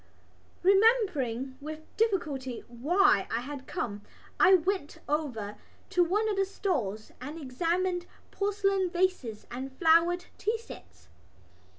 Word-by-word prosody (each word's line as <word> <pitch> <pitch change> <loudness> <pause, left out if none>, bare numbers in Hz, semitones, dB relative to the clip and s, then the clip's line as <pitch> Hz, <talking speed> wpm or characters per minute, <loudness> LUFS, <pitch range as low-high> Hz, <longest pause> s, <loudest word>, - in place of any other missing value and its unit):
Remembering 360 - +3
with 310 +1 -6
difficulty 300 - -1
why 290 - +3
I 230 - -1
had 275 +1 -7
come 205 -4 -3 0.4
I 380 - +8
went 370 -3 -1
over 250 -9 -2 0.3
to 360 - +4
one 410 +6 +1
of 415 -2 -1
the 390 - +3
stalls 245 - -2
and 295 +5 -6
examined 345 +6 -1 0.2
porcelain 395 -2 +1
vases 345 - -1
and 260 +3 -5
flowered 340 +2 +4
tea 440 +2 0
sets. 455 - -13
335 Hz, 115 wpm, -29 LUFS, 260-385 Hz, 0.4 s, I